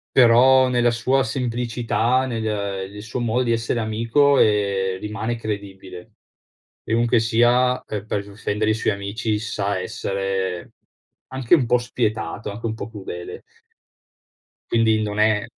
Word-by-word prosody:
però 130 +2 +6
nella 120 -1 +2
sua 130 +3 +1
semplicità, 120 +1 -1
nel, 115 -3 -3
ehm 100 -3 -3
nel 105 +1 -9
suo 115 +3 -5
modo 120 +2 0
di 120 - +1
essere 115 +1 -1
amico, 115 +6 +2
ehm, 100 -3 +1
rimane 110 +3 -3
credibile. 100 -4 -7 0.7
Chiunque 120 +1 +2
sia, 120 +3 +2
ehm, 105 -1 -6
per 100 -2 -2
difendere 105 +1 -2
i 110 - +3
suoi 110 -2 0
amici, 105 +2 -2
sa 100 -2 -2
essere 95 -2 -3 0.6
anche 130 0 +2
un 140 -8 +3
po' 125 - +3
spietato, 115 -3 -3
anche 105 +3 -9
un 115 - -1
po' 115 - -6
crudele. 95 -5 -8 1.3
Quindi 110 -1 +3
non 105 -1 -3
è 105 -1 +3
110 Hz, 140 wpm, -22 LUFS, 100-120 Hz, 1.3 s, però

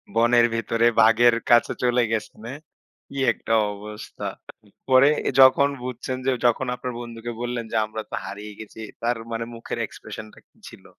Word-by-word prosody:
বনের 120 +1 +5
ভেতরে 115 0 0 0.2
বাঘের 115 +2 +5
কাছে 120 0 +5
চলে 125 0 +3
গেছেন, 110 -1 -3
হ্যাঁ? 140 +4 -7 0.5
কি 140 - -10 0.2
একটা 115 - -3 0.2
অবস্থা। 105 +1 -9 0.4
উম 105 - -23 0.2
পরে 130 +2 +7 0.3
যখন 130 +2 +6
বুঝছেন 130 +1 -4
যে, 135 - +3
যখন 120 +2 +2
আপনার 125 0 -5
বন্ধুকে 120 0 -7
বললেন 120 -1 -3
যে, - - -3
"আমরা 110 +1 -6
তো - - -4
হারিয়ে 105 +1 -8
গেছি" 110 +1 -10 0.2
তার 120 0 0
মানে 115 0 -3
মুখের 115 0 -6
expression 110 0 -9
টা - - -16
কি - - -36
ছিল? - - -16
120 Hz, 170 wpm, -24 LUFS, 110-125 Hz, 0.5 s, পরে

